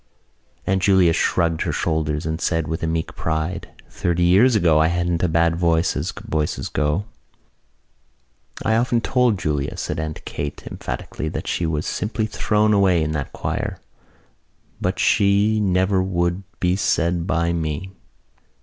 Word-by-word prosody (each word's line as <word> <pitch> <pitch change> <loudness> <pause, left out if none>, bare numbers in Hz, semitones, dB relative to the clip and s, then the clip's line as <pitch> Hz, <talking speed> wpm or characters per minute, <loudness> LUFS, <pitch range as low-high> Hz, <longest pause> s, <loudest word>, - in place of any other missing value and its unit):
Aunt 95 0 +1
Julia 95 -3 +4
shrugged 85 -1 +1
her - - 0
shoulders 75 -2 -1
and 80 +1 -3
said 80 -3 0
with 80 +1 -3
meek 80 0 -2
pride: 80 +2 -2 0.2
"Thirty 85 0 -1
years 100 +8 +5
ago 85 -6 +4
I 80 - +4
hadn't 85 0 0
a 90 - +2
bad 85 0 +2
voice 85 -1 +2
as - - -2 0.2
voices 75 -1 -1
go." 75 +6 0 1.6
"I 110 +1 +3
often 120 0 +2
told 125 -3 +2
Julia," 75 -5 -2
said 75 - -3
Aunt 80 -1 -5
Kate 75 0 -5
emphatically, 65 +5 -5
"that - - -5
she 85 - -1
was 75 -2 -2
simply 110 +1 -2
thrown 105 0 +1
away 95 -5 +3
in 80 - -2
that 75 -3 -3
choir. - - -3 1.0
But - - -1
she 100 +2 +3
never 95 0 +2
would 85 0 0 0.2
be 90 0 +2
said 85 -2 0
by 85 -1 +1
me." 80 +3 -3
85 Hz, 150 wpm, -22 LUFS, 80-95 Hz, 1.6 s, years